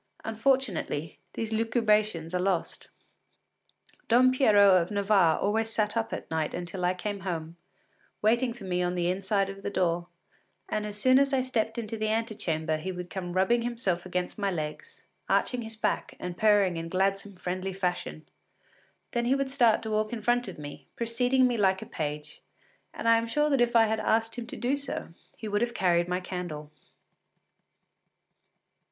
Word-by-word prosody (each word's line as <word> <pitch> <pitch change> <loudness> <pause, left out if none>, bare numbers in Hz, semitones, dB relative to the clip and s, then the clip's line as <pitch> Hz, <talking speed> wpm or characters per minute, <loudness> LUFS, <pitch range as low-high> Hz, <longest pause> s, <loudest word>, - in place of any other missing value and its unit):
Unfortunately, 225 - -1 0.2
these 225 -1 -3
lucubrations 215 -6 +1
are 180 - +1
lost. 180 -2 -2 1.2
Don 250 +2 +5
Pierrot 205 -8 +6
of 170 - -4
Navarre 200 -5 +3
always 220 +2 0
sat 215 -1 0
up 225 -1 -1
at - - -6
night 160 -1 -1
until 180 +1 -5
I 180 +1 +1
came 205 +2 -4
home, 170 -3 -4 0.6
waiting 235 +3 +2
for 230 - -10
me 180 -1 -1
on 180 0 0
the 175 0 +1
inside 195 +1 0
of 195 0 -8
the - - -3
door, 175 -3 0 0.6
and 210 0 -2
as 210 0 -6
soon 255 +4 +5
as 275 0 +2
I 260 -1 +2
stepped 225 -3 -1
into 225 -1 -4
the 215 0 -1
antechamber 185 -8 -1
he 180 +5 -4
would 180 -1 -7
come 180 -2 -4
rubbing 190 +6 +3
himself 230 -7 -1
against 180 +2 -3
my 200 -1 +1
legs, 155 -4 -6 0.2
arching 250 -1 +1
his 225 -1 -7
back 220 - -2
and 180 -1 -5
purring 205 -4 +3
in 165 0 -5
gladsome, 195 +2 0
friendly 185 +1 -3
fashion. 180 -4 -3 0.9
Then 235 -1 0
he 255 +3 +3
would 275 -1 -1
start 240 -6 +3
to 220 - -4
walk 215 0 0
in 230 -3 -5
front 240 +1 +2
of 190 - -7
me, 145 -1 -9
preceding 245 +3 +2
me 245 -2 +1
like 190 -2 +2
a - - -10
page, 150 -1 -5 0.5
and - - -5
I 230 0 +6
am 230 - -3
sure 295 +6 +1
that 275 -3 +3
if 240 0 +2
I 225 -1 +7
had 220 0 0
asked 225 +1 +1
him 240 -1 -6
to - - -7
do 255 +3 +1
so, 280 -1 -5 0.3
he 220 - -6
would 205 0 0
have 240 0 -1
carried 175 -2 +2
my 180 0 -1
candle. 175 -5 -6
205 Hz, 180 wpm, -28 LUFS, 180-230 Hz, 1.2 s, I